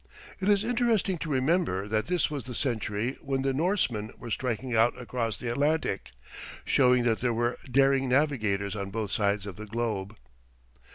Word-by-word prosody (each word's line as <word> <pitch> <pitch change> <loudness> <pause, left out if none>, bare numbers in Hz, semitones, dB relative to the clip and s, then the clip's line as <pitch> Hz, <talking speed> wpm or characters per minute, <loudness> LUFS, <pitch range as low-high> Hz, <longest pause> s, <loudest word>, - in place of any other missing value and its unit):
It 195 +1 0
is 205 0 +4
interesting 230 -6 +1
to 160 - -4
remember 135 - +1
that 110 0 0
this 180 -3 +1
was 140 -6 -4
the 125 -2 -6
century 115 -1 -1
when 135 -1 -1
the 135 0 +1
Norsemen 135 - 0
were 120 - -8
striking 125 +1 -2
out 115 +2 +3
across 115 -4 -2
the 120 - -6
Atlantic, 145 - 0 0.6
showing 125 -2 +4
that 115 -2 +1
there 120 -2 0
were 120 +1 0
daring 135 0 +3
navigators 110 -8 +1
on 100 -1 -4
both 105 -1 -3
sides 100 -1 +1
of 100 -4 -7
the 110 0 -8
globe. 105 -2 -3
125 Hz, 170 wpm, -28 LUFS, 110-140 Hz, 0.6 s, is